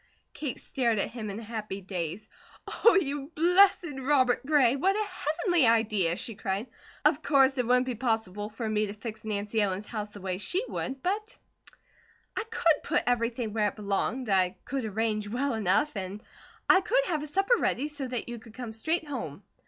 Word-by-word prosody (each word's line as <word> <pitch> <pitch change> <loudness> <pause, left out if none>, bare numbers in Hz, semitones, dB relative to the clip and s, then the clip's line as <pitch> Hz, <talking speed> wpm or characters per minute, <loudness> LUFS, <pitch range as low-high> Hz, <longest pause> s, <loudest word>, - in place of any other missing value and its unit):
Kate 290 -5 -4
stared 235 -4 0
at 200 - 0
him 225 -3 -5
in 200 +2 -5
a - - -8
happy 215 -3 -5
daze. 185 0 -4 0.6
"Oh, 465 - +8
you 290 -5 0
blessed 360 +3 +5
Robert 260 -2 +2
Gray! 270 -4 +4
What 380 +8 +2
a 425 0 0 0.4
Heavenly 350 - +4
idea!" 215 -7 +2
she 230 - -5
cried. 195 +1 -2 0.4
"Of - - +4
course 270 -2 +4
it 245 - +1
wouldn't 250 +1 +4
be 255 - -2
possible 220 -4 -1
for 225 +1 -5
me 215 -1 +1
to 200 - -5
fix 220 +1 -8
Nancy 210 0 -1
Ellen's 200 0 -1
house 210 -1 -5
the 205 - -9
way 185 -1 -3
she 370 - -1
would, 265 0 -4
but 425 +5 -2 1.0
I - - -1
could 335 -9 +2
put - - +1
everything 235 -2 0
where 215 -2 +2
it 205 - -4
belonged, 215 +5 -1
I 190 -1 +2
could 270 -3 -3
arrange 215 0 -1
well 265 +5 -1
enough, 220 +7 +2
and 195 +2 -5 0.4
I 380 - +6
could - - +2
have 315 -4 -1
a 300 - -5
supper 390 +9 +2
ready, 285 - 0
so 290 -3 -5
that 245 -2 -4
you 240 -1 -6
could 225 -1 -15
come 240 -3 -6
straight 315 +9 -1
home." 210 - -5
235 Hz, 190 wpm, -28 LUFS, 210-285 Hz, 1.0 s, Oh